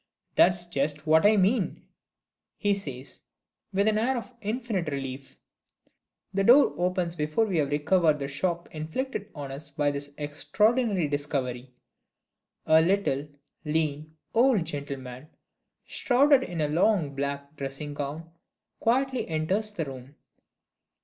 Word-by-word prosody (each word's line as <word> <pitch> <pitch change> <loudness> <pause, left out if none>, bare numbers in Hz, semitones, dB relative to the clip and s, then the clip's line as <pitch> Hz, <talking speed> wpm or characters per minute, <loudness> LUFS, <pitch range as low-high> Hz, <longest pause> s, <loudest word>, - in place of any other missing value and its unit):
"That's 175 -1 +4
just 150 -2 -1
what 160 +4 +5
I 215 0 +4
mean!" 200 +2 +1 0.7
he 205 -2 +2
says, 140 -10 -5 0.5
with 200 +2 +2
an 215 0 +3
air 255 +3 +1
of 240 +1 -7
infinite 215 -5 -2
relief. 135 -1 -6 1.0
The 195 0 +1
door 255 +7 +6
opens 180 -1 -1
before 155 +7 +1
we 190 -5 -1
have 145 -2 +1
recovered 155 +2 +3
the 140 -1 -4
shock 170 +5 -2
inflicted 200 - -4
on 140 -2 -6
us 140 +2 -7
by 145 0 0
this 145 0 -5
extraordinary 205 - +1
discovery. 135 -3 -3 1.0
A 160 0 +6
little, 165 -6 +1 0.4
lean, 155 0 -2 0.2
old 235 -7 +4
gentleman, 140 -2 -6 0.6
shrouded 275 +2 +3
in 175 -10 -4
a 150 - +2
long 165 -1 +2
black 140 +1 -4
dressing 140 +1 -5
gown, 145 +3 -5 0.5
quietly 260 +2 +1
enters 185 +7 -1
the 175 -6 -3
room. 135 +1 -10
160 Hz, 130 wpm, -27 LUFS, 145-200 Hz, 1.0 s, door